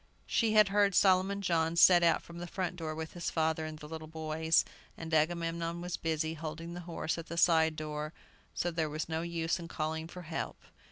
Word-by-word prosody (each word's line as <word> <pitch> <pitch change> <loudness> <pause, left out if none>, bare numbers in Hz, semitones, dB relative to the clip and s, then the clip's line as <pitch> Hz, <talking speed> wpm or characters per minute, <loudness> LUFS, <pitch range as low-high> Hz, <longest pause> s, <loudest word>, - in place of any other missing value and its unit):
She 225 -2 +1
had 215 -2 +6
heard 200 -1 +3
Solomon 195 +1 +3
John 165 -2 +1
set 175 +1 +7
out 165 -2 +3
from 170 0 -10
the 175 - -5
front 180 0 -3
door 160 -3 -4
with 160 0 -6
his 175 - -3
father 160 -1 0
and 155 0 -7
the 150 - -10
little 160 0 -7
boys, 160 0 +1 0.3
and 165 0 -7
Agamemnon 165 +1 0
was 175 0 -3
busy 160 -1 -1
holding 165 +1 -6
the 175 - -6
horse 165 0 -2
at 165 - -8
the 170 - -6
side 160 -2 +4
door, 150 0 -4 0.4
so 175 - 0
there 165 -2 -1
was 155 +1 -3
no 160 0 -2
use 170 +1 -1
in 170 - -7
calling 160 0 -3
for 180 +1 -9
help. 160 0 -4
165 Hz, 210 wpm, -32 LUFS, 160-175 Hz, 0.4 s, set